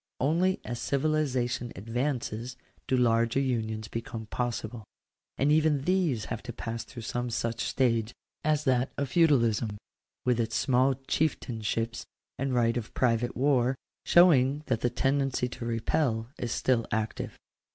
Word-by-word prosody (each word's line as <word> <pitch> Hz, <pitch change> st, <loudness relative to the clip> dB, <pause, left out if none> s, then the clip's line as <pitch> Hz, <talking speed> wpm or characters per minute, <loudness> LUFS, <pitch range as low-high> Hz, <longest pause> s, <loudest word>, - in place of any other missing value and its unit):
Only 170 Hz, +7 st, +2 dB
as 120 Hz, +1 st, -4 dB
civilization 130 Hz, -5 st, 0 dB
advances 120 Hz, +2 st, -3 dB, 0.3 s
do 130 Hz, -, +2 dB
larger 115 Hz, 0 st, +3 dB
unions 110 Hz, -5 st, -1 dB
become 115 Hz, 0 st, -5 dB
possible. 115 Hz, -1 st, -3 dB, 0.5 s
And 140 Hz, +2 st, +3 dB
even 150 Hz, -2 st, +3 dB
these 175 Hz, -, +1 dB
have 115 Hz, -, -4 dB
to 120 Hz, -, -6 dB
pass 115 Hz, 0 st, -4 dB
through 120 Hz, -4 st, -10 dB
some 120 Hz, +2 st, -2 dB
such 115 Hz, 0 st, -2 dB
stage 115 Hz, -4 st, +1 dB, 0.3 s
as 150 Hz, -1 st, +2 dB
that 130 Hz, -2 st, +2 dB
of 140 Hz, -2 st, -1 dB
feudalism, 120 Hz, -10 st, +3 dB, 0.5 s
with 125 Hz, -2 st, +2 dB
its 115 Hz, -, -1 dB
small 130 Hz, 0 st, +3 dB
chieftainships 115 Hz, -5 st, -2 dB, 0.4 s
and 135 Hz, 0 st, -1 dB
right 120 Hz, -1 st, +2 dB
of 115 Hz, -3 st, -6 dB
private 120 Hz, -1 st, +1 dB
war, 130 Hz, -1 st, +3 dB, 0.3 s
showing 150 Hz, -5 st, +5 dB
that 115 Hz, -5 st, -1 dB
the 120 Hz, -, +2 dB
tendency 135 Hz, 0 st, 0 dB
to 120 Hz, -, -7 dB
repel 115 Hz, 0 st, 0 dB
is 120 Hz, -, -3 dB
still 120 Hz, -2 st, +1 dB
active. 110 Hz, -1 st, -2 dB
125 Hz, 140 wpm, -29 LUFS, 115-135 Hz, 0.5 s, showing